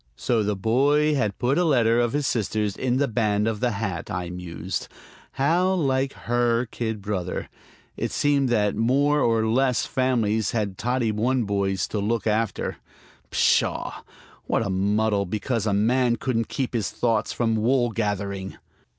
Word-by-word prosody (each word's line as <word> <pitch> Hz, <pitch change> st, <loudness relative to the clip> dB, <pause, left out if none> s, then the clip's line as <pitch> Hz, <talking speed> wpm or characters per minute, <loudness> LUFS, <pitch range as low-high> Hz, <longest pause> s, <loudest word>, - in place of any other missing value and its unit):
So 120 Hz, -3 st, 0 dB
the 105 Hz, 0 st, 0 dB
boy 140 Hz, +9 st, +2 dB
had 105 Hz, -8 st, 0 dB
put 130 Hz, +7 st, +1 dB
a -, -, +3 dB
letter 120 Hz, -7 st, +3 dB
of 120 Hz, 0 st, +1 dB
his 145 Hz, 0 st, 0 dB
sister's 105 Hz, -3 st, -1 dB
in 130 Hz, -1 st, 0 dB
the 140 Hz, +1 st, +2 dB
band 105 Hz, -3 st, +1 dB
of 110 Hz, -2 st, -1 dB
the 125 Hz, -, +1 dB
hat, 95 Hz, -5 st, -4 dB
I 90 Hz, 0 st, -4 dB
mused. 90 Hz, 0 st, -5 dB, 0.5 s
How 175 Hz, +7 st, +2 dB
like 135 Hz, -5 st, 0 dB
her 120 Hz, 0 st, +1 dB
kid 110 Hz, -3 st, -4 dB
brother! 95 Hz, -4 st, -3 dB, 0.5 s
It -, -, -2 dB
seemed 140 Hz, -2 st, +2 dB
that 105 Hz, -4 st, +1 dB
more 140 Hz, +6 st, +2 dB
or 115 Hz, -2 st, +2 dB
less 125 Hz, +2 st, +2 dB
families 115 Hz, -5 st, 0 dB
had 105 Hz, -4 st, -2 dB
Toddy 120 Hz, -1 st, 0 dB
One 120 Hz, +4 st, +1 dB
Boys 100 Hz, -3 st, -1 dB
to 105 Hz, -, -2 dB
look 105 Hz, +1 st, -1 dB
after. 110 Hz, -2 st, -1 dB, 0.5 s
Pshaw! -, -, +1 dB, 0.5 s
what 115 Hz, -, +1 dB
a 100 Hz, -, -2 dB
muddle 100 Hz, +1 st, +1 dB
because 110 Hz, +3 st, -2 dB
a -, -, +2 dB
man 120 Hz, +4 st, +2 dB
couldn't 115 Hz, -2 st, -1 dB
keep 135 Hz, -4 st, -3 dB
his 115 Hz, -4 st, -1 dB
thoughts 115 Hz, -3 st, 0 dB
from 115 Hz, -2 st, 0 dB
wool 120 Hz, +2 st, +2 dB
gathering! 100 Hz, -3 st, -3 dB
115 Hz, 160 wpm, -24 LUFS, 105-130 Hz, 0.5 s, a